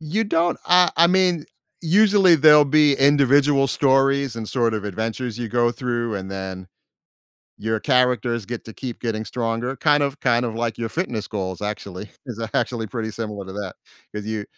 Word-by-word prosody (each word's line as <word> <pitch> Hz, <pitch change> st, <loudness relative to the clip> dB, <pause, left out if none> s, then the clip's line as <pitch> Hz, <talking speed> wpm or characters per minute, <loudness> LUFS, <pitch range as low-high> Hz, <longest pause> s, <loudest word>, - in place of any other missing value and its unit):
You 170 Hz, +9 st, -2 dB
don't 175 Hz, -4 st, 0 dB
I 180 Hz, 0 st, +5 dB
I 170 Hz, +1 st, +6 dB
mean, 180 Hz, -3 st, +1 dB, 0.4 s
usually 195 Hz, +1 st, +4 dB
there'll 150 Hz, -1 st, +6 dB
be 150 Hz, 0 st, +4 dB
individual 140 Hz, 0 st, +4 dB
stories 135 Hz, -1 st, +1 dB
and 110 Hz, -2 st, -6 dB
sort 115 Hz, -3 st, 0 dB
of 105 Hz, -1 st, -4 dB
adventures 110 Hz, +3 st, -4 dB
you 120 Hz, -2 st, -4 dB
go 120 Hz, +1 st, +1 dB
through 120 Hz, -2 st, -3 dB
and 95 Hz, 0 st, -7 dB
then, 95 Hz, -1 st, -6 dB, 0.9 s
your 110 Hz, 0 st, -2 dB
characters 125 Hz, -4 st, +1 dB
get 120 Hz, -1 st, -6 dB
to 110 Hz, -, -9 dB
keep 125 Hz, -1 st, -7 dB
getting 110 Hz, -2 st, -3 dB
stronger, 115 Hz, +2 st, -3 dB
kind 145 Hz, 0 st, +2 dB
of 140 Hz, +1 st, -4 dB
kind 120 Hz, -1 st, +1 dB
of 115 Hz, -2 st, -4 dB
like 115 Hz, 0 st, -3 dB
your 115 Hz, -1 st, -3 dB
fitness 120 Hz, -, -4 dB
goals 95 Hz, -3 st, -5 dB
actually, 105 Hz, -1 st, -6 dB, 0.2 s
is 115 Hz, -3 st, -7 dB
actually 115 Hz, -3 st, -1 dB
pretty 110 Hz, 0 st, -5 dB
similar 105 Hz, -3 st, -6 dB
to 95 Hz, -, -9 dB
that 100 Hz, -2 st, -6 dB, 0.4 s
'cause 105 Hz, -1 st, -5 dB
you 110 Hz, -2 st, -4 dB
120 Hz, 175 wpm, -21 LUFS, 110-145 Hz, 0.9 s, I